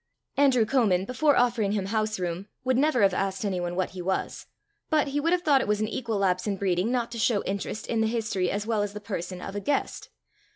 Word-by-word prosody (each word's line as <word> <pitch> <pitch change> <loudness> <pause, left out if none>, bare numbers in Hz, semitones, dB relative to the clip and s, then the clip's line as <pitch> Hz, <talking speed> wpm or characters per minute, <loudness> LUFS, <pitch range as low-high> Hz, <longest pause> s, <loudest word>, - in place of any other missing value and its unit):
Andrew 265 -5 +4
Comin, 210 -7 +2
before 285 +5 +2
offering 235 -4 +2
him 200 -3 -1
house 215 0 -1
room, 180 +2 -3 0.2
would 260 0 +1
never 265 -3 +3
have 195 -2 +4
asked 195 +2 -1
anyone 175 -3 -2
what 185 0 -1
he 185 - -7
was; 190 +2 -3 0.4
but 305 -3 +2
he 285 +1 -1
would 330 +3 +1
have 360 0 +2
thought 280 -4 +4
it - - -3
an 215 - 0
equal 225 -1 -3
lapse 185 0 +1
in 200 -1 -1
breeding 185 +1 0
not 240 -2 -1
to 235 - -5
show 215 -1 +2
interest 200 +2 -4
in 225 -1 0
the 220 - +2
history 220 -5 -1
as 205 +1 -2
well 220 -2 0
as 205 0 -2
the 210 - -6
person 185 -3 -5
of 195 - -6
a - - -1
guest. 280 +7 -2
215 Hz, 235 wpm, -27 LUFS, 195-245 Hz, 0.4 s, Andrew